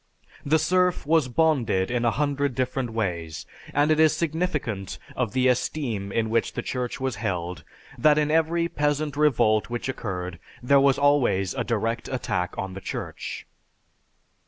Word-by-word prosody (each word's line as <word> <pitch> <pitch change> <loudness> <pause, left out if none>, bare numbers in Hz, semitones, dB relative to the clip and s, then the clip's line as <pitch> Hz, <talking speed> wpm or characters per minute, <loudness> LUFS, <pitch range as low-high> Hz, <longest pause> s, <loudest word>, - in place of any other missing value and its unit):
The 155 +3 +3
serf 180 +2 +1
was 160 -2 +3
bonded 120 -9 +1
in 120 -1 0
a - - +5
hundred 140 0 0
different 130 0 -1
ways, 85 -8 -3 0.3
and 145 +2 +2
it 155 - +3
is 160 -1 +5
significant 150 - -2 0.2
of 125 -5 -1
the 130 0 +3
esteem 120 -5 -1
in 110 0 0
which 115 0 +1
the - - -4
Church 125 0 -3
was 130 -2 -2
held 90 -5 -3 0.4
that 150 -1 +5
in 150 0 +2
every 165 +1 +2
peasant 145 -2 -1
revolt 120 -8 +3
which 120 +1 -3
occurred, 90 -8 -4 0.2
there 140 +3 +5
was 135 -1 +4
always 135 -10 +2
a 125 - -2
direct 115 0 -1
attack 90 -8 -2
on 95 -1 -4
the 95 - -7
Church. - - -6
130 Hz, 155 wpm, -25 LUFS, 110-150 Hz, 0.4 s, a